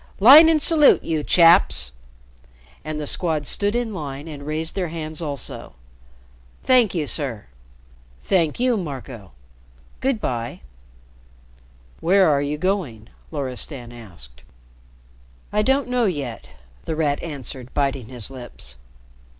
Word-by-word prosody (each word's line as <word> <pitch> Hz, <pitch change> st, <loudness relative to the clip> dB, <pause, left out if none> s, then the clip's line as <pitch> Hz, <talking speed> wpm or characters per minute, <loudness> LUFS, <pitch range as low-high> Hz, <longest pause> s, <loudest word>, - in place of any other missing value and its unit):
"Line 285 Hz, +10 st, +9 dB
and 320 Hz, -1 st, +3 dB
salute, 300 Hz, -1 st, +5 dB
you 155 Hz, -2 st, -2 dB
chaps!" 165 Hz, -, +5 dB, 0.9 s
And 155 Hz, 0 st, -5 dB
the 150 Hz, -, -4 dB
Squad 155 Hz, -1 st, -1 dB
stood 205 Hz, +7 st, 0 dB
in 240 Hz, -3 st, -2 dB
line 145 Hz, -3 st, -6 dB
and 145 Hz, -2 st, -9 dB
raised 160 Hz, +1 st, -2 dB
their 185 Hz, -3 st, -2 dB
hands 155 Hz, -1 st, -5 dB
also. 145 Hz, -, -5 dB, 0.9 s
"Thank 245 Hz, -7 st, +3 dB
you, 160 Hz, -3 st, -1 dB
sir. 135 Hz, -8 st, -3 dB, 0.8 s
Thank 170 Hz, -3 st, 0 dB
you, 250 Hz, -2 st, +2 dB
Marco. 130 Hz, -, -7 dB, 0.7 s
Good 265 Hz, -4 st, 0 dB
by." 120 Hz, -, -4 dB, 1.4 s
"Where 190 Hz, +3 st, +4 dB
are 145 Hz, -2 st, +2 dB
you 145 Hz, +1 st, -2 dB
going?" 150 Hz, -, -3 dB, 0.2 s
Loristan 130 Hz, -3 st, -5 dB
asked. 85 Hz, -, -10 dB, 1.1 s
"I 210 Hz, -, +2 dB
don't 265 Hz, +5 st, +1 dB
know 250 Hz, -1 st, +1 dB
yet," 140 Hz, -, -4 dB, 0.4 s
The 160 Hz, -, -3 dB
Rat 150 Hz, -2 st, 0 dB
answered, 135 Hz, -5 st, -7 dB
biting 135 Hz, -4 st, -1 dB
his 125 Hz, -1 st, -4 dB
lips. 120 Hz, -, -11 dB
150 Hz, 125 wpm, -22 LUFS, 130-190 Hz, 1.4 s, Line